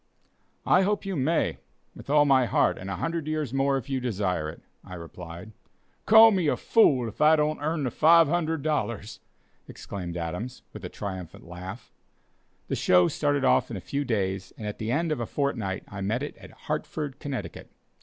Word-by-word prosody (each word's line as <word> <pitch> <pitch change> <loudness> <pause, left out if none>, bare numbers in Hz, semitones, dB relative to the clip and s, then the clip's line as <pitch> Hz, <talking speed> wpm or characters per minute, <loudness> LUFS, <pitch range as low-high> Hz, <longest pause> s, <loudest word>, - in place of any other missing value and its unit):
"I 185 - +5
hope 205 +1 0
you 195 -1 -3
may, 155 +4 0 0.4
with - - -12
all 145 0 +5
my 130 -3 +4
heart, - - +2
and 95 - -7
a 95 - -2
hundred 165 - -3
years 155 -5 -2
more 135 0 +2
if 130 - -6
you 135 -2 -1
desire 95 -10 -1
it," - - -11 0.2
I 90 - -9
replied. 85 +3 -9 0.6
"Call 220 +1 +9
me 185 -6 +1
a - - +1
fool 135 - +3
if 110 - -8
I 155 +1 +7
don't 155 0 0
earn 155 0 -1
the 125 - -1
$500!" 155 - +2 0.5
exclaimed 90 -3 -7
Adams, 90 +10 -5
with 105 - -9
a 90 - -5
triumphant 95 -5 -7
laugh. 90 +6 -9 0.8
The - - -1
"show" 90 -1 +4
started 145 -2 0
off 130 0 +3
in 115 - -5
a - - -5
few 140 +9 -3
days, 95 -6 -2
and 110 - -7
at 105 - -5
the 110 +1 -2
end 160 +4 0
of 155 - -1
a 115 - -3
fortnight 115 -10 -2
I 100 -1 -7
met 110 +7 -1
it 145 - -6
at - - -13
Hartford, 145 -3 -5
Connecticut. 140 -4 -6
130 Hz, 185 wpm, -26 LUFS, 95-155 Hz, 0.8 s, Call